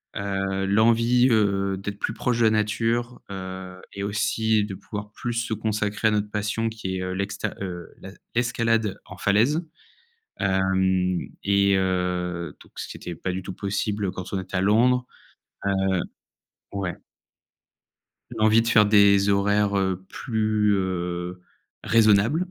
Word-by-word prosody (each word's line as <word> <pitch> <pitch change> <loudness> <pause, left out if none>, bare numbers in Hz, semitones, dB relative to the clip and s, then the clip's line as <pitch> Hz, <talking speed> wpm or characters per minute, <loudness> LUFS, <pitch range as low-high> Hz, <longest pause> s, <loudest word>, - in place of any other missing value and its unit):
heu, 95 -1 -2
l'envie, 115 +4 +4
heu, 100 -3 +2
d'être 100 +1 -6
plus 115 - -2
proche 120 -1 0
de - - +3
la - - +6
nature, 115 +3 0
heu 95 -1 -7
et 100 - -6
aussi 105 +1 +1
de 105 - -6
pouvoir 105 +2 -7
plus 120 +2 -4
se 115 -1 -1
consacrer 105 0 -1
à - - +3
notre 105 0 -1
passion 105 +2 -1
qui 95 -4 -4
est, - - -3
heu, 95 0 -3
l'exte 100 +1 -3 0.2
heu, 90 -3 -5
la 95 - -8 0.2
l'escalade 115 -3 +1
en 95 - -11
falaise, 115 - +2 0.8
hem 95 -1 +1 0.2
et 100 0 +3
heu, 90 -3 -1
donc, - - -18
ce - - -5
qui - - -8
était 90 - -7
pas 95 - -4
du 90 +1 -3
tout 95 - -6
possible 100 0 -2
quand 95 -1 -8
on 95 - -1
est 95 - -11
à 95 - +2
Londres, 125 +5 +3 0.6
heu 100 - +2 1.0
ouais. 95 -3 -3 1.4
L'envie 110 +1 +4
de 115 - -3
faire 105 -2 +6
des 100 -1 +5
horaires, 100 0 +2
heu, 95 -1 -1
plus, 110 -3 0
heu, 90 -1 -3 0.4
raisonnables, 115 - +4
100 Hz, 150 wpm, -24 LUFS, 95-110 Hz, 1.4 s, la